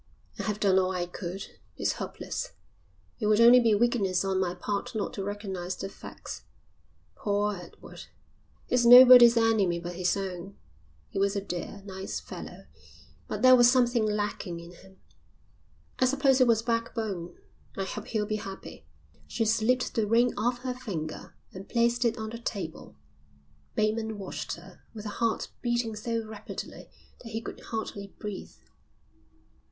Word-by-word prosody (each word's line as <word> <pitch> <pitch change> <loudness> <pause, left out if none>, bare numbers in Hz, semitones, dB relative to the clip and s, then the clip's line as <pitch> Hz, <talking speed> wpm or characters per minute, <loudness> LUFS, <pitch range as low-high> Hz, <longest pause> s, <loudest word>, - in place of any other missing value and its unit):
I - - -2
have 210 -1 -2
done 190 -2 +4
all 185 0 +1
I 180 -1 -1
could. 180 +2 -6 0.3
It's - - +1
hopeless. - - -5 0.7
It 215 - 0
would 215 0 +4
only 240 +2 +8
be 225 -3 +3
weakness 200 -5 +1
on 190 -1 0
my 180 -1 -1
part 205 +1 -4
not 215 - -2
to 195 - -4
recognise 190 -3 -4
the 195 - -5
facts. - - -9 0.7
Poor 205 0 0
Edward, 175 -2 -11 0.6
he's 250 -1 +2
nobody's 245 -1 +10
enemy 220 -6 +3
but 175 +1 -6
his 185 +1 +1
own. 190 0 -6 0.5
He - - -4
was 200 +1 +1
a - - +1
dear, 195 +1 -6
nice 190 -1 -5
fellow, - - -9 0.6
but 210 +2 -4
there 255 0 +9
was 240 -1 +7
something 245 -2 +3
lacking 205 -4 -2
in 170 +1 -11
him, 190 +2 -17 1.0
I 255 - +4
suppose 270 0 +3
it 255 - +6
was 225 -1 +3
backbone. 225 -6 -2 0.4
I 195 - -1
hope 205 +2 -6
he'll 215 -2 -1
be 215 0 -2
happy." 195 -2 -9 0.4
She 225 - -1
slipped 225 +3 +1
the 220 -2 0
ring 235 +3 +3
off 245 +3 -1
her 255 -1 -2
finger 185 -12 -6 0.2
and 190 +1 -10
placed 235 +1 +2
it 235 +1 +1
on 220 0 -5
the 230 - -7
table. 190 -8 -6 0.8
Bateman 220 0 0
watched 195 -2 -5
her 180 +2 -15
with 210 -1 -8
a - - -3
heart 230 -1 0
beating 240 -2 -1
so 230 +1 -3
rapidly 215 -1 -8 0.3
that 230 - -10
he 225 - -1
could 225 - -8
hardly 215 -3 -5
breathe. 210 -3 -7
210 Hz, 160 wpm, -28 LUFS, 195-235 Hz, 1.0 s, nobody's